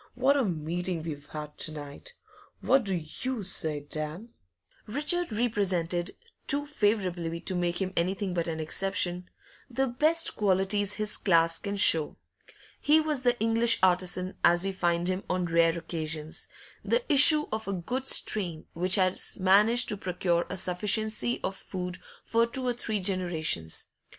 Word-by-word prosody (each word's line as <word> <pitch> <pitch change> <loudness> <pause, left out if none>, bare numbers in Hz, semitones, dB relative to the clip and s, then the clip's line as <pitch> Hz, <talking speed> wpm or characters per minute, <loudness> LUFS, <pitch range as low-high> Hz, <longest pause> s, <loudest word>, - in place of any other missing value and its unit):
What 265 +3 +2
a 280 - +2
meeting 175 -1 -3
we've 145 -3 -7
had 150 -1 -9
to 155 - -1
night! 150 - -9 0.4
What 260 -2 +2
do 195 -2 -1
you 205 +9 -5
say, 160 -5 -1
Dan?' 155 +8 -6 0.6
Richard 300 +7 -1
represented 190 -6 -1 0.4
too 290 +1 +2
favourably 185 - -1
to - - -2
make 175 -1 -1
him 190 -1 -3
anything 190 +2 -1
but 170 -1 -2
an 160 -1 -4
exception 180 +2 -1 0.4
the 265 +2 -1
best 305 +7 +1
qualities 200 0 +1
his 215 -1 -1
class 165 -3 +2
can 200 0 -4
show. 160 -5 +5 0.6
He 305 +2 +4
was 305 -4 -1
the 245 -1 +1
English 230 +1 +3
artisan 185 0 +2
as 175 +1 +4
we 195 - -2
find 175 -2 -1
him 185 +1 -2
on 180 -1 -1
rare 165 0 +2
occasions, 155 -2 -5 0.3
the 480 - 0
issue 300 +1 +7
of 220 -1 -4
a 200 - -2
good 250 +9 -4
strain 175 -7 +1
which 180 +2 +3
has 185 -2 0
managed 210 +6 +4
to 210 - +1
procure 175 -2 -1
a - - -5
sufficiency 215 +6 0
of 190 - -3
food 180 -2 -7 0.2
for 230 +1 +1
two 255 +2 -2
or 245 - 0
three 220 -3 -3
generations. 175 - -1
185 Hz, 155 wpm, -27 LUFS, 170-225 Hz, 0.6 s, issue